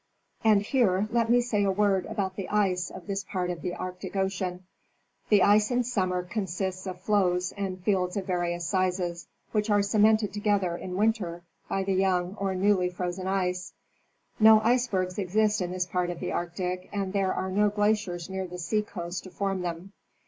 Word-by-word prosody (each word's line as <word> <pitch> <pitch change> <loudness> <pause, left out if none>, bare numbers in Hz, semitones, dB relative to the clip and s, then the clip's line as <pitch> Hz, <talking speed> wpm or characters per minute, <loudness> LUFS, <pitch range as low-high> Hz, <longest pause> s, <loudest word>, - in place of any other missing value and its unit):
And 215 -2 +5
here 205 -5 +2
let 230 -1 +1
me 245 +1 +5
say 220 -4 0
a 200 - +2
word 195 -1 +2
about 190 -2 -2
the 195 - -5
ice 190 -4 +1
of 185 - -10
this 200 -1 -3
part 180 -2 -2
of 175 - -6
the 180 -2 -3
Arctic 185 +2 -6
ocean. 190 -2 -2 0.6
The 205 -3 +5
ice 210 +1 +5
in 250 0 +1
summer 185 -7 0
consists 190 -1 -3
of 185 -1 -5
floes 180 -3 +1
and 195 -2 -4
fields 185 -2 +1
of 195 - -2
various 175 -2 -1
sizes, 180 -2 -1 0.2
which 210 0 0
are 205 -1 +4
cemented 210 0 +3
together 205 -4 +1
in 180 +1 -6
winter 195 -5 0 0.3
by 195 - 0
the 195 0 0
young 185 0 +1
or 195 -1 -1
newly 185 -1 +2
frozen 180 +1 -4
ice. 180 -2 -1 0.7
No 220 0 +8
icebergs 215 -6 +1
exist 210 +2 +1
in 180 - -1
this 180 0 -1
part 180 0 -1
of 175 -1 -5
the - - -3
Arctic, 180 +1 -3
as 195 -2 -2
there 195 -2 +1
are 190 0 -2
no 210 +2 +3
glaciers 205 -4 0
near 190 -1 -4
the 180 0 -8
sea 210 +5 0
coast 175 -3 -6
to - - -8
form 195 +1 -2
them. 175 +2 -5
190 Hz, 185 wpm, -27 LUFS, 180-205 Hz, 0.7 s, No